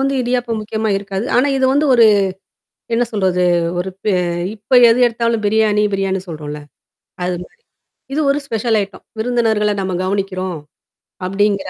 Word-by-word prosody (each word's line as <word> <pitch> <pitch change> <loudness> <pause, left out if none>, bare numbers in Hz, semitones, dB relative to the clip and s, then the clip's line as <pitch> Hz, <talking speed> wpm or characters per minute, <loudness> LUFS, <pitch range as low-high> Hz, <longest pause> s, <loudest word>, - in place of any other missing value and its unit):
வந்து 275 0 +1
இடியாப்பம் 245 -2 -1
முக்கியமா 220 +1 -3
இருக்காது. 195 +1 -4
ஆனா 255 +3 +4
இது 265 - +1
வந்து 290 +2 +2
ஒரு 235 -2 +6 0.9
என்ன 245 +1 +2
சொல்றது? 185 -3 +1 0.3
ஒரு 185 +2 -2
ப - - -59 0.5
இப்ப 210 +2 -23 0.2
எது 230 +2 +3
எடுத்தாலும் 230 -1 -1
பிரியாணி, 210 0 +2
பிரியாணின் 190 -1 -1
சொல்றோம்ல? 150 -2 -6 0.6
அது 180 0 -1
மாரி. 470 - -23 0.5
இது 310 - 0
ஒரு 280 - +2
ஸ்பெஷல் 225 -2 0
ஐட்டம். 200 0 -8 0.2
விருந்தினர்கள 220 -3 +1
நம்ம 190 -1 -2
கவனிக்கிறோம். 185 -2 -2 0.7
அப்படிங்கிற 195 0 0
210 Hz, 145 wpm, -17 LUFS, 190-235 Hz, 0.9 s, ஒரு